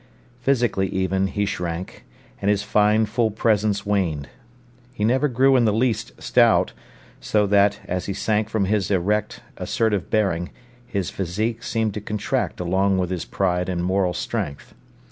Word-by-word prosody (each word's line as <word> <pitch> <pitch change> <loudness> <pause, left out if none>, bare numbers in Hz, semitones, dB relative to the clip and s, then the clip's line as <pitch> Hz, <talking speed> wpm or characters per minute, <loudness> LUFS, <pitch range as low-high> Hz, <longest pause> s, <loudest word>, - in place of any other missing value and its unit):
Physically 120 -7 +1
even, 95 0 0
he 100 +1 -1
shrank, 90 -2 -5 0.4
and 100 - +1
his 105 -1 +2
fine 105 +1 +3
full 110 +1 +1
presence 105 -1 +1
waned. 90 -8 -1 0.6
He 120 -5 -4
never 130 +6 +3
grew 135 +1 +3
in 120 -2 +4
the 110 - +3
least 115 +1 -1
stout, - - +3 0.5
so 105 -1 +1
that, 100 0 +3
as 90 0 -3
he 100 - -2
sank 105 +1 0
from 110 -3 0
his 100 -2 0
erect, 100 +2 0 0.2
assertive 105 -5 -1
bearing, 95 -6 0 0.4
his 100 -4 -2
physique 110 +6 -2
seemed 110 -2 -1
to 105 - -5
contract 105 0 -2
along 95 +2 +1
with 90 -1 -1
his 90 -3 -3
pride 90 -1 -1
and 85 -1 -1
moral 95 -1 +1
strength. 70 -1 -4
100 Hz, 155 wpm, -23 LUFS, 95-110 Hz, 0.6 s, in